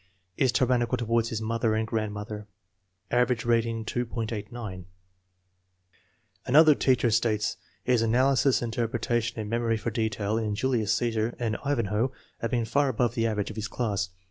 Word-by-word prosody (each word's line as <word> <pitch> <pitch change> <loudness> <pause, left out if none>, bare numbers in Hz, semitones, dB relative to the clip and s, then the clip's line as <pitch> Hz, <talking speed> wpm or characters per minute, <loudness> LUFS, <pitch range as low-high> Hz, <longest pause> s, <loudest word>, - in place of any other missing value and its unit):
Is 130 -2 +2
tyrannical 125 -1 +2
toward 115 -1 +1
his 110 -1 -3
mother 115 0 0
and 110 0 0
grand 110 -1 -2
mother. 105 0 -6 0.6
Average 125 -1 +2
rating, 115 -1 +1
2.89. 115 -4 -4 1.6
Another 155 +4 +7
teacher 130 -4 +2
states: 110 -1 +1 0.3
"His 125 -2 +2
analysis, 130 +2 +3
interpreta 120 0 -1
tion 115 0 -4
and 105 - -5
memory 115 0 0
for 115 +2 -3
detail 110 -1 -1
in 105 -2 -2
Julius 115 -3 +1
Ccesar 115 -1 -1
and 115 -3 -1
Ivan 140 -5 0
hoe 115 +5 +1 0.3
have 115 - -2
been 120 -1 0
far 140 +5 +2
above 120 -1 0
the 115 -1 +1
average 105 -1 -2
of - - -10
his 110 0 -2
class." 105 -5 -2
115 Hz, 155 wpm, -27 LUFS, 110-120 Hz, 1.6 s, Another